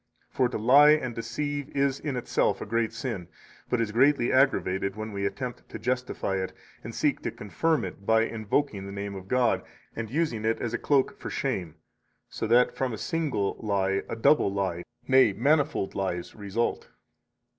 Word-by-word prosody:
For 125 -2 +2
to - - -3
lie 140 +7 +7
and 130 -6 -1
deceive 145 +5 -3
is 140 -1 +1
in 145 -4 -3
itself 125 - 0
a - - -5
great 115 +1 0
sin, 115 -7 -5 0.4
but 125 - +1
is 115 -2 0
greatly 130 +2 +3
aggravated 100 -8 +2
when 110 0 -5
we 100 -1 -1
attempt 125 +3 -6
to - - -6
justify 125 -6 -2
it, 95 0 -3 0.3
and - - -7
seek - - +1
to - - -2
confirm 155 +7 -1
it 100 - -8
by 110 +2 +4
invoking 110 -1 -1
the - - -7
name 100 0 -5
of 95 -1 -8
God 125 +1 +2 0.3
and 110 -1 -4
using 135 -5 -1
it 110 +1 +1
as 120 -1 -3
a 120 - -1
cloak 145 +9 +1
for - - -6
shame, 95 - -2 0.5
so 110 - -3
that 120 +2 +4
from 130 -3 -1
a - - -4
single 140 -9 -1
lie 100 -2 0
a - - -3
double 115 -1 +4
lie, 95 -3 -1 0.3
nay, 130 -5 +5
manifold 140 -1 +1
lies, 90 -3 -3
result. 105 +2 -2
115 Hz, 180 wpm, -27 LUFS, 100-135 Hz, 0.5 s, lie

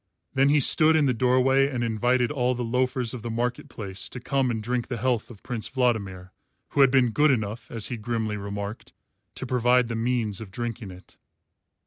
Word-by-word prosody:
Then 135 0 +3
he 150 +1 +4
stood 155 +4 +5
in 155 -2 +3
the 130 - +2
doorway 130 +3 +3
and 125 -4 -2
invited 120 +3 +1
all 125 -3 0
the 125 - -3
loafers 125 0 0
of 125 - -6
the 115 - -5
market 120 +2 -2
place 95 -3 -6
to 125 - -6
come 135 +1 0
and 115 -2 -1
drink 120 +2 -2
the 120 - -4
health 120 0 -1
of 110 -5 -14
Prince 120 -3 -4
Vladimir, 100 -8 -1 0.4
who 140 - +2
had 135 - +7
been 125 -3 +3
good 150 +6 +3
enough, 110 -3 -2
as 115 -3 -4
he 120 - -4
grimly 110 -1 -2
remarked, 100 +1 -6 0.4
to - - -5
provide 125 -1 +2
the 115 - -3
means 115 -3 -1
of 110 - -8
drinking 115 0 -5
it. 90 0 -14
120 Hz, 200 wpm, -25 LUFS, 110-130 Hz, 0.4 s, had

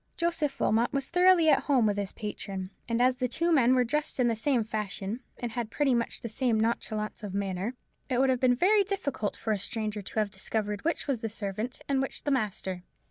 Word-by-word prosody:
Joseph 335 -5 0
Wilmot 230 +2 +2
was 275 -1 -2
thoroughly 360 -1 +5
at - - +4
home 265 -6 +3
with 205 -1 +2
his 200 -1 -3
patron; 195 -3 -5 0.2
and 230 0 +1
as 255 +1 +3
the 250 - 0
two 335 +8 0
men 260 -5 +5
were 250 - +4
dressed 295 +4 0
in 250 - +4
the 230 - +1
same 240 +1 +1
fashion, 210 0 -3 0.2
and 240 -2 -4
had 230 -1 -3
pretty 275 +2 +1
much 235 -1 -1
the - - -4
same 230 0 0
nonchalance 220 -1 -1
of 200 -3 -5
manner, 200 +4 -2 0.3
it 255 - +1
would 265 0 +4
have 255 - 0
been 250 -1 +4
very 400 - +4
difficult 290 - -2
for 220 - -1
a 205 - -2
stranger 215 0 -3
to 195 - -9
have 210 -2 +1
discovered 210 +1 -2
which 330 +1 0
was 270 -6 -1
the 225 - -2
servant 215 +3 -4
and 275 -1 +1
which 270 - -3
the 290 - 0
master. 195 -7 -1
235 Hz, 225 wpm, -29 LUFS, 210-270 Hz, 0.3 s, thoroughly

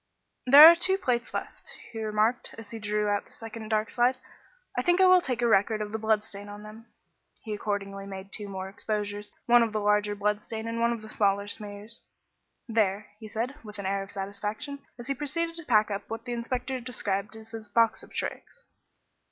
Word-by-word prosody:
"There 285 +4 +12
are 340 - +9
two 370 +3 +2
plates 250 -9 -1
left," - - -6
he 225 - -5
remarked, 215 +3 0
as 225 -2 -10
he 225 - -6
drew 210 0 0
out 205 0 0
the - - -22
second 225 -1 -8
dark 215 0 +1
slide. 250 +1 +2 0.6
"I - - +1
think 350 0 +3
I 380 - +7
will 370 -1 +7
take 250 -5 -2
a - - +4
record 215 0 +3
of 210 -1 -4
the 220 - -3
blood 220 -1 +2
stain 205 -1 -8
on 205 +1 -9
them." 220 +2 -12 0.6
He 220 - -4
accordingly 200 -1 -3
made 195 0 -8
two 205 -2 -3
more 190 -1 -5
exposures 205 +1 -4
one 240 0 +6
of 225 -2 +1
the 215 - 0
larger 210 0 +2
blood 210 +1 0
stain 220 +1 -5
and 230 0 -3
one 235 0 +3
of 230 -2 -4
the - - -9
smaller 200 -1 +1
smears. 205 +2 -5 0.7
"There," 210 -3 +1 0.2
said 225 +4 -2
he, 285 - -18
with 210 -2 -9
an 200 - -6
air 195 +1 0
of 195 - -8
satisfaction, 205 +8 -5 0.2
as 240 - -8
he 275 - 0
proceeded 330 +5 -1
to 335 - -5
pack 215 -4 +3
up 200 - -4
what 225 +1 -6
the 245 - -3
inspector 250 +2 -3
described 215 -4 -2
as 220 0 -11
his 220 -2 -8
"box 230 +2 +3
of - - -14
tricks." - - -5
220 Hz, 215 wpm, -28 LUFS, 205-240 Hz, 0.7 s, There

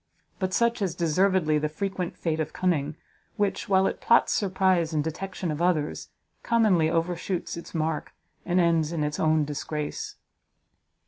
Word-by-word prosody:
But 185 -2 -1
such 235 +3 +1
is 185 -4 -1
deservedly 170 -1 +2
the 150 0 -1
frequent 180 +2 -3
fate 160 -2 -1
of 155 -1 -2
cunning, 160 -5 0 0.4
which, 205 -1 -1
while 190 -1 +4
it - - -2
plots 235 - +4
surprise 185 -4 +1
and 150 -1 +1
detection 180 +2 -4
of 150 +2 -4
others, 165 -4 0 0.3
commonly 210 -9 +3
overshoots 170 +2 -2
its 170 +1 -9
mark, 160 -1 -1 0.3
and 180 0 +1
ends 165 -2 +2
in 165 -3 -1
its 150 0 -2
own 155 -1 +3
disgrace. 150 +1 -4
170 Hz, 150 wpm, -26 LUFS, 155-190 Hz, 0.4 s, while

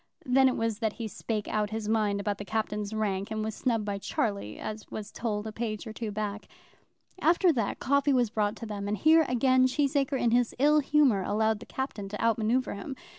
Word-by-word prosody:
Then 265 +1 +5
it 255 - 0
was 225 -2 -1
that 220 -2 0
he 230 - -5
spake 215 0 -4
out 210 -1 0
his 220 -1 -4
mind 210 -2 +1
about 205 0 -2
the - - -4
Captain's 210 -1 -2
rank, 200 -3 -1
and 215 -1 -2
was 220 0 -3
snubbed 225 -3 -1
by 200 -1 -3
Charlie, 200 - -2
as 215 0 -6
was 215 0 -6
told 215 -2 -3
a 220 - -4
page 215 -1 -4
or 220 - -7
two 225 -1 -4
back. 210 0 -4 0.7
After 340 +2 +4
that, 225 -6 -1
coffee 280 +1 +2
was 245 -5 +2
brought 210 -2 0
to 230 - -7
them, 205 -2 -5
and 210 +1 -1
here 320 +3 +5
again 255 +1 +4
Cheesacre 280 0 0
in 235 - +2
his 240 0 +2
ill 300 +3 +5
humour 280 -8 +3
allowed 220 +2 +1
the 235 - -12
Captain 225 -7 -4
to 210 - -6
out 230 0 +2
manoeuvre 240 +4 +1
him. 205 +7 -6
220 Hz, 220 wpm, -28 LUFS, 210-255 Hz, 0.7 s, Then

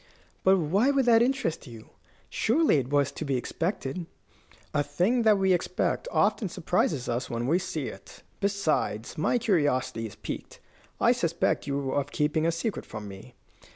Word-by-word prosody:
"But 190 +1 +5
why 190 - +2
should 275 -2 +2
that 230 -2 +6
interest 245 - 0
you? 115 -3 -12 0.4
Surely 285 - +2
it 130 -2 -2
was 140 -1 +2
to 150 - -6
be 140 -3 -1
expected." 165 - -3 0.7
"A 145 - +2
thing 180 - +1
that 215 -2 +5
we 190 -1 +3
expect 180 - -1
often 205 - +1
surprises 155 -6 0
us 120 +2 -2
when 115 0 -2
we 165 +7 +2
see 170 -6 -4
it. - - -10 0.2
Besides, 165 - -1
my 155 +9 +1
curiosity 145 - 0
is 105 - -12
piqued. - - -7 0.4
I - - +5
suspect - - 0
you 140 -1 -1
of 140 0 -1
keeping 155 +2 +1
a - - +3
secret 170 +6 -3
from 105 -1 -7
me." 95 -1 -11
160 Hz, 165 wpm, -27 LUFS, 135-200 Hz, 0.7 s, that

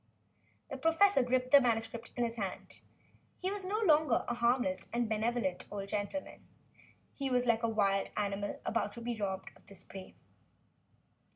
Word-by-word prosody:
The - - -3
professor 330 +1 +4
gripped 255 0 0
the 285 - +9
manuscript 230 -1 -1
in 245 - 0
his 230 0 -4
hand. 195 -4 -5 0.6
He 370 +1 -2
was 405 -1 -4
no 390 +3 -1
longer 310 - +4
a 240 - 0
harmless 245 +4 +1
and 235 -1 0
benevolent 220 -3 -1
old 200 -1 -5
gentleman. 210 +8 -4 0.7
He 275 -1 -2
was 250 -1 +2
like 230 -1 +3
a 230 - +1
wild 195 -3 +1
animal 200 0 -2
about 215 -3 -1
to 235 - -9
be 240 0 -2
robbed 195 -3 -3
of - - -21
its 195 -2 -12
prey. 190 -1 -10
235 Hz, 165 wpm, -33 LUFS, 205-260 Hz, 0.7 s, the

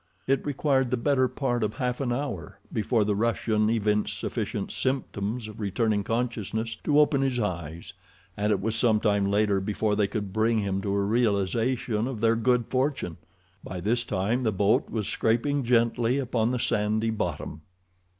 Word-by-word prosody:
It 135 0 +1
required 140 -2 +1
the 125 - 0
better 130 +1 +2
part 125 -1 -1
of 105 0 -2
half 125 -1 -2
an 125 -3 -1
hour 120 - -4
before 110 0 +1
the 105 - +1
Russian 110 -1 +1
evinced 105 -2 +1
sufficient - - -3
symptoms 120 -4 -2
of 110 0 -10
returning 105 0 0
consciousness 115 -1 -2
to 150 0 +4
open 145 -2 +4
his 130 -2 0
eyes, 85 -6 -4 0.4
and 105 +1 0
it 100 - +2
was 110 +3 -1
some 115 -2 +3
time 100 -2 +1
later 100 -1 +2
before 105 +1 0
they 105 -1 +2
could 100 -3 -4
bring 110 +1 +2
him 100 -2 -1
to 100 0 -1
a 100 - +1
realization 115 +2 +1
of 130 -5 -4
their 115 +1 +3
good 120 +1 +2
fortune. 130 - -1 0.5
By 90 - -6
this 115 +6 0
time 110 +4 -1
the 115 -3 +1
boat 100 +2 +2
was 110 -3 -2
scraping 130 +6 +1
gently 120 +1 +2
upon 120 -4 0
the 125 - 0
sandy 110 0 +1
bottom. 90 -7 -4
115 Hz, 170 wpm, -27 LUFS, 105-125 Hz, 0.5 s, to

